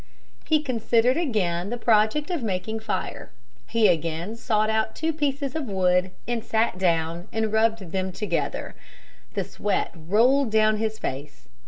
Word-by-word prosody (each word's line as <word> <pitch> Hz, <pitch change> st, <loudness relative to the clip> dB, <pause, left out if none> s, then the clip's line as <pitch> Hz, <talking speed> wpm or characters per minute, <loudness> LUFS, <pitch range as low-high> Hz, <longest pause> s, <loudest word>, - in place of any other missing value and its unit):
He 310 Hz, -1 st, +2 dB
considered 240 Hz, -1 st, +2 dB
again 200 Hz, -, 0 dB
the 240 Hz, -, -3 dB
project 230 Hz, -, +2 dB
of 340 Hz, -5 st, -1 dB
making 220 Hz, +1 st, -2 dB
fire. 220 Hz, -1 st, -4 dB, 0.4 s
He 230 Hz, -2 st, +3 dB
again 165 Hz, +5 st, -1 dB
sought 215 Hz, -2 st, +1 dB
out 220 Hz, 0 st, 0 dB
two 320 Hz, +1 st, -1 dB
pieces 285 Hz, -2 st, -1 dB
of 315 Hz, -3 st, -2 dB
wood 185 Hz, -2 st, +2 dB, 0.2 s
and 235 Hz, -2 st, -1 dB
sat 220 Hz, -4 st, 0 dB
down 170 Hz, 0 st, 0 dB
and 220 Hz, -1 st, -1 dB
rubbed 220 Hz, -5 st, +1 dB
them 190 Hz, 0 st, -1 dB
together. 210 Hz, +3 st, -2 dB, 0.6 s
The -, -, 0 dB
sweat 205 Hz, -, -2 dB
rolled 230 Hz, -, +3 dB
down 215 Hz, 0 st, +3 dB
his 220 Hz, 0 st, -2 dB
face. 140 Hz, -2 st, -6 dB
220 Hz, 150 wpm, -25 LUFS, 185-240 Hz, 0.6 s, He